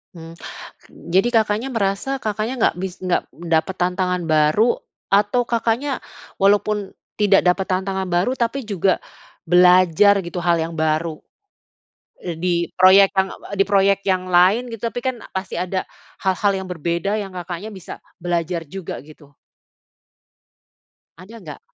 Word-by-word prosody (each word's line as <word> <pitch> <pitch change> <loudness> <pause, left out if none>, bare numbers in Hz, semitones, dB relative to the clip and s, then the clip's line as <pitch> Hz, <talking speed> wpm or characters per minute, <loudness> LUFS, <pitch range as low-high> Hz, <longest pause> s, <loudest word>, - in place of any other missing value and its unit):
Hmm, 165 0 -10 0.8
jadi 190 +6 +3
Kakaknya 220 0 +1
merasa 220 +6 -1
Kakaknya 215 +3 -2
nggak 230 - +1
bis 190 -1 -4
nggak 180 -1 0
dapat 170 +2 -1
tantangan 180 0 -1
baru 155 +8 +2 0.3
atau 205 +5 +3
Kakaknya 235 +4 -1 0.4
walaupun 205 0 +1 0.2
tidak 205 -2 +4
dapat 185 +1 +1
tantangan 190 0 -2
baru 180 +7 +1
tapi 245 +3 -1
juga 195 -3 +1 0.5
belajar 180 +3 +5
gitu 175 +1 -5
hal 175 0 +2
yang 165 - -5
baru? 160 0 -1 1.1
Eee, 165 -2 -5
di 180 -1 +1 0.2
proyek 190 +1 +6
yang 190 -1 +1
apa - - -14
di - - +6
proyek 200 0 +3
yang 185 -1 +1
lain 200 +8 +4
gitu 230 +1 -3
tapi 245 +1 -7
kan 260 -3 -2 0.2
pasti 190 0 -4
ada 185 +1 -2 0.4
hal-hal 195 +2 +2
yang - - -10
berbeda 170 +5 -2
yang 195 -2 -7
Kakaknya 175 +3 -6
bisa 190 -5 -10 0.2
belajar 170 -1 -2
juga, 180 +3 -7
gitu. 150 -1 -16 1.9
Ada 205 +6 -12
nggak? 155 -8 -10
190 Hz, 140 wpm, -20 LUFS, 175-210 Hz, 1.9 s, proyek